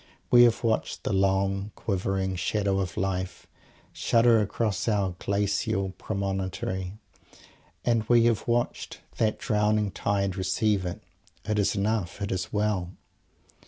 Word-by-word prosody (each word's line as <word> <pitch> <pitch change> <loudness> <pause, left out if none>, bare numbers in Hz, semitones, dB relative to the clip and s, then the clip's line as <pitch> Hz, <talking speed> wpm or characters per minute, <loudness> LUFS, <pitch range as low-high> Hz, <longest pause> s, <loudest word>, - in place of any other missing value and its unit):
We 120 0 +8
have 120 0 +2
watched 110 -9 -1
the - - -1
long, 95 +1 +1
quivering 95 -1 -1
Shadow 100 +2 0
of 90 -3 -3
Life 95 -1 -2 0.5
shudder 115 -1 +4
across 105 0 -1
our 100 -4 +1
glacial 100 0 0
promontory, 95 -2 -3 0.9
and 115 -2 +3
we 120 -1 +6
have 115 -2 +1
watched 120 0 -1 0.2
that 110 -1 +1
drowning 105 -1 +1
tide 100 -1 -1
receive 95 +1 +1
it. 85 - -6 0.4
It 105 0 0
is 100 - +1
enough. 100 -3 -1
It 100 -1 -3
is 90 -1 -2
well. 105 -4 -1
100 Hz, 125 wpm, -27 LUFS, 95-110 Hz, 0.9 s, We